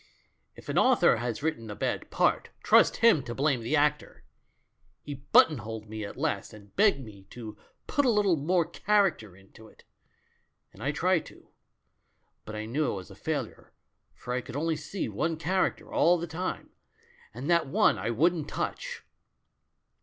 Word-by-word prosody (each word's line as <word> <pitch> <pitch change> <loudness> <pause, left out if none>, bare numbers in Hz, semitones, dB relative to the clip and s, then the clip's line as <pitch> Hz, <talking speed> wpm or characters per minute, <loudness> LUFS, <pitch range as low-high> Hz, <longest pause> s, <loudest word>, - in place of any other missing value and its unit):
If - - -14
an - - +1
author - - +4
has 120 +2 -4
written 135 -9 -2
a 105 - -6
bad - - -3
part, - - +1
trust - - +5
him 200 -11 +6
to 120 -2 -7
blame 135 -3 +1
the 115 +7 0
actor! 150 0 0 0.8
He 145 - -6
button 140 +1 +4
holed 110 0 -7
me 110 0 -6
at 100 - -7
last, - - -2
and 100 -2 -15
begged 200 -8 +4
me 100 -3 -14
'to 110 -3 -9 0.3
put 285 - +1
a 260 - +3
little 205 -5 +3
more 170 +4 +1
character 180 - 0
into 100 +3 -17
it.' - - -20 0.9
And 100 - -15
I 135 +5 0
tried 175 +3 +1
to. - - -17 1.0
But 105 - -7
I 105 0 -4
knew 140 +7 -1
it - - -4
was 95 0 -9
a - - -12
failure, 140 -1 -5 0.4
for 125 - -6
I 125 - -1
could 125 - -10
only 160 +2 0
see 155 +6 -4
one 160 +10 -2
charac 185 +4 0
ter - - -15
all 175 +2 +4
the 170 - -4
time 175 +3 -5 0.3
— - - -29
and 130 +4 -6
that 170 -4 +3
one 135 - +3
I 105 +5 -2
wouldn't 155 +5 +1
touch. - - -4
145 Hz, 180 wpm, -28 LUFS, 110-170 Hz, 1.0 s, him